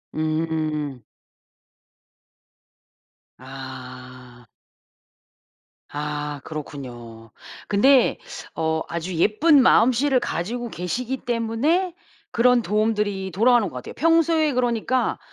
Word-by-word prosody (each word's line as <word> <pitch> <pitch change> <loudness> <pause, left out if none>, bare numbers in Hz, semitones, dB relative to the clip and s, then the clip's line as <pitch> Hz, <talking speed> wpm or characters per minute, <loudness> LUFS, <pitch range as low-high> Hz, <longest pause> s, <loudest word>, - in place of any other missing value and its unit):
음. 155 -4 -2 2.4
아. 130 -2 -11 1.4
아 150 -1 -4
그렇군요. 120 -7 -9 0.4
근데 255 +6 +4 0.4
어 160 0 -1
아주 170 +2 -4
예쁜 265 - +4
마음씨를 255 +2 +4
가지고 235 +5 -3
계시기 240 +10 -3
때문에 245 +11 0 0.4
그런 245 +1 +4
도움들이 210 -3 -1
돌아오는 225 +1 +3
것 - - -14
같아요. 125 - -7
평소에 325 -1 +3
그러니까 245 0 0
190 Hz, 190 characters per minute, -23 LUFS, 145-245 Hz, 2.4 s, 근데